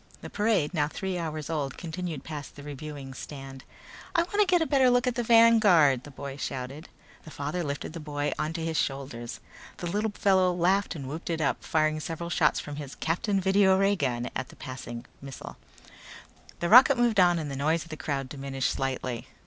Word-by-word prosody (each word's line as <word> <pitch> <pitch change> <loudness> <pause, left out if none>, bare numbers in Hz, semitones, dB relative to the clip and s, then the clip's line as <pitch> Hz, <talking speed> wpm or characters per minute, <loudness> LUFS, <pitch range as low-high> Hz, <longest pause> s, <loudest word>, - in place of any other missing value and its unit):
The - - -8
parade, 205 -7 +1
now 150 -3 +1
three 185 +3 -4
hours 155 -2 -4
old, 150 -5 -3
continued 170 -4 -5
past 150 -2 -7
the 145 - -10
reviewing 145 -1 -7
stand. 135 -1 -9 0.5
"I 335 - +4
wanna 410 +3 +1
get 360 -1 +4
a 320 - +1
better 270 -4 +4
look 245 +1 +3
at 250 - +1
the 240 - -1
Vanguard!" 215 - +5
the - - -9
boy 140 0 -7
shouted. 135 +3 -5 0.3
The - - -11
father 150 +4 -3
lifted 145 +1 -4
the 165 - -6
boy 145 -1 -2
onto 160 +2 -2
his 160 -1 -1
shoulders. 130 -4 -3 0.4
The - - -6
little 205 +5 0
fellow 190 -2 +3
laughed 185 +2 +1
and 140 -4 -6
whooped 155 +6 -6
it 165 -1 -1
up, 145 -3 0
firing 155 -1 +1
several 165 +2 -5
shots 155 -3 +3
from 145 -1 -7
his 145 -2 -7
Captain 195 +5 0
Video 190 0 +4
Ray 195 +1 +3
gun 125 -7 -2
at 130 - -3
the - - -14
passing 120 -2 -7 0.2
missile. 135 -2 -9 1.0
The 170 - 0
rocket 255 +5 +8
moved 240 -4 +3
on 175 -1 +5
and 150 -3 -4
the - - -4
noise 155 +4 +1
of 165 - -16
the 155 - -5
crowd 140 -3 -3
diminished 135 -1 -2
slightly. 130 -3 -3
155 Hz, 195 wpm, -28 LUFS, 140-190 Hz, 1.0 s, rocket